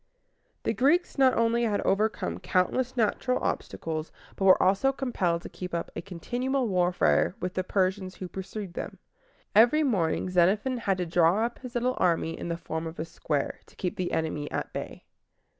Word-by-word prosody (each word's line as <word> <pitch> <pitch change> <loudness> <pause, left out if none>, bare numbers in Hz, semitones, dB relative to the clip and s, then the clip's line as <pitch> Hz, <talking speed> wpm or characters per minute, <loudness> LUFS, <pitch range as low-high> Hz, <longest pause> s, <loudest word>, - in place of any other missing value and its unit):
The - - 0
Greeks 300 +4 +2
not 260 -1 +5
only 230 +1 +2
had 215 -3 +1
to - - -3
overcome 195 - 0
countless 240 - 0
natural 245 +3 +1
obstacles, 160 -1 -3 0.2
but 195 - -1
were 190 - +7
also 195 +9 +3
compelled 190 -11 -1
to - - -6
keep 180 -1 -6
up 170 - -3
a - - -3
continual 245 +9 -2
warfare 180 -1 +2
with 180 0 -3
the 185 - -1
Persians 185 0 0
who 185 - -6
pursued 190 0 -6
them. - - -6 0.6
Every 240 +9 +6
morning 185 - +1
Xenophon 200 +8 +2
had 195 -5 0
to 180 - -1
draw 175 +5 +3
up 235 - -5
his 250 -2 -9
little 250 +2 0
army 165 -2 +1
in - - -6
the 170 0 -2
form 160 -1 -4
of 160 - -8
a 160 - -3
square, 150 -3 -2
to - - -21
keep 180 - -3
the 180 -1 -2
enemy 155 -2 -2
at - - -4
bay. - - -6
190 Hz, 185 wpm, -28 LUFS, 170-240 Hz, 0.6 s, were